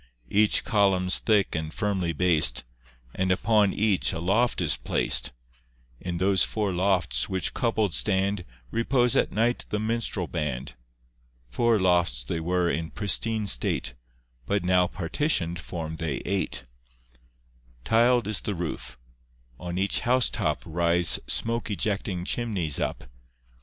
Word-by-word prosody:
Each 105 +1 +3
column's 95 -5 +2
thick 105 -3 +2
and 80 -1 -3
firmly 95 -3 -1
bas'd, 85 -1 +2 0.5
And 95 0 0
upon 105 +1 +3
each 105 -3 +1
a 80 - -4
loft 105 +8 +1
is 80 -5 +2
plac'd; - - +2 0.7
In 90 -1 -4
those 95 +1 +3
four 105 -3 -1
lofts, 90 -9 +1
which 95 -1 -1
coupled 110 -6 0
stand, 95 +3 +1 0.3
Repose 120 +1 +1
at - - +2
night 115 +3 0
the 105 - -1
minstrel 110 -4 -2
band. 70 -6 -4 0.8
Four 115 - +2
lofts 90 -9 +2
they 80 +7 -3
were 90 +1 0
in 80 +1 -2
pristine 110 +1 -1
state, - - 0 0.5
But 100 +5 0
now 90 0 +3
partition'd 90 - -1
form 80 -1 -6
they 80 -4 -2
eight. 95 -9 -2 1.2
Tiled 120 - +3
is 105 -3 -1
the 105 - -3
roof. 85 -7 -5 0.6
On 90 0 -5
each 95 +1 +1
house 125 0 +2
top - - -1
Rise 85 +1 +2
smoke 115 -1 -1
ejecting 100 -3 -2
chimneys 100 - -1
up. - - -3
95 Hz, 130 wpm, -26 LUFS, 85-110 Hz, 1.2 s, Each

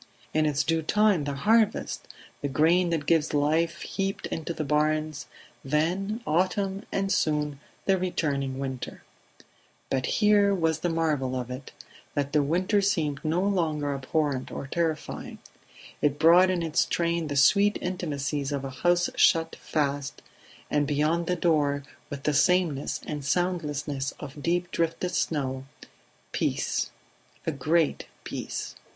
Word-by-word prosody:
In 155 0 +3
its 145 -1 +1
due 165 0 +1
time 205 -1 +3
the 140 -1 -2
harvest; 220 +8 +1 0.3
the 145 - -1
grain 165 +5 +3
that 160 -4 -1
gives 155 -2 +2
life 160 +4 +1
heaped 195 0 -3
into 165 +1 -4
the 160 - -3
barns; 155 0 0 0.4
then 180 - 0
autumn 190 +4 0
and 195 0 0
soon 150 -5 0 0.3
the 190 -1 +3
returning 140 -7 -1
winter... 130 -2 -5 0.9
But 130 -1 0
here 205 -2 +4
was 160 -3 +1
the 175 - 0
marvel 150 -6 0
of 125 0 -5
it, 130 +2 -7 0.4
that 140 0 -1
the 150 - +4
winter 185 +8 +1
seemed 155 -8 0
no 165 +4 +1
longer 155 -7 0
abhorrent 140 0 -1
or - - -5
terrifying; 160 +1 -3 0.6
it 145 -1 +2
brought 170 +4 +6
in 180 -2 0
its 160 0 +2
train 170 -1 0
the 145 - -3
sweet 200 +9 +5
intimacies 150 -5 -2
of 140 -1 -2
a 135 - -5
house 175 +5 +2
shut 165 0 +3
fast, 140 -2 -2 0.5
and 145 -1 +2
beyond 155 +4 +1
the 180 - +1
door, 150 -5 +1 0.3
with 140 -1 -6
the 150 - +1
sameness 160 -2 +2
and 150 -1 -4
the 140 - -7
soundlessness 150 -5 -1
of 145 0 -8
deep 175 +2 0
drifted 170 +2 -1
snow, 135 -4 -1 0.7
peace, - - -1 0.6
a - - +1
great 155 +2 +1 0.2
peace - - -5
155 Hz, 145 wpm, -27 LUFS, 145-175 Hz, 0.9 s, brought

